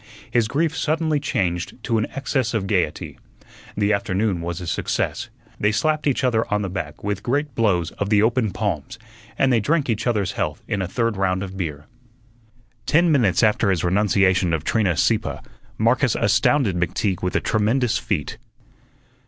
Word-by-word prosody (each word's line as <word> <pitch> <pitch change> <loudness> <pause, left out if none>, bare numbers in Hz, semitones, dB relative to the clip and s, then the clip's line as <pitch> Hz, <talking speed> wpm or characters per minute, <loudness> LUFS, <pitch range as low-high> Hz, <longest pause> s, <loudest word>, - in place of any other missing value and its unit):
His 120 -3 +2
grief 160 +6 0
suddenly 155 -1 0
changed 90 - -2
to 115 -3 +1
an 110 - -1
excess 130 -4 -1
of 105 -3 -1
gaiety. 90 -6 -1 0.6
The 105 0 +2
afternoon 100 -2 0
was 85 0 -4
a 90 - -6
success. 80 - -2 0.3
They 105 - +2
slapped 155 +5 0
each 140 -1 +1
other 115 -4 +1
on 105 0 +1
the 95 - -4
back 100 - -6
with 105 -1 -2
great 140 +5 -1
blows 100 -8 +1
of 100 - -1
the 105 -1 +4
open 115 -1 +2
palms, 95 -8 -3 0.4
and 135 -1 +3
they 115 - +4
drank 140 +3 +1
each 110 +2 -2
other's 105 -6 0
health - - -3
in 100 - -1
a 95 - -2
third 115 +2 -1
round 95 0 0
of 95 -1 -7
beer. 75 -6 -4 1.0
Ten 170 +2 +4
minutes 115 - +3
after 105 -1 +3
his 90 -4 +1
renunciation 95 -1 +2
of 80 -2 -1
Trina 95 -3 +1
Sieppe, - - +1 0.4
Marcus 120 +2 +2
astounded 110 +1 +2
McTeague 90 +2 -1
with 90 - -2
a - - +4
tremendous 115 +2 +1
feat. 105 - -3
105 Hz, 170 wpm, -22 LUFS, 95-125 Hz, 1.0 s, the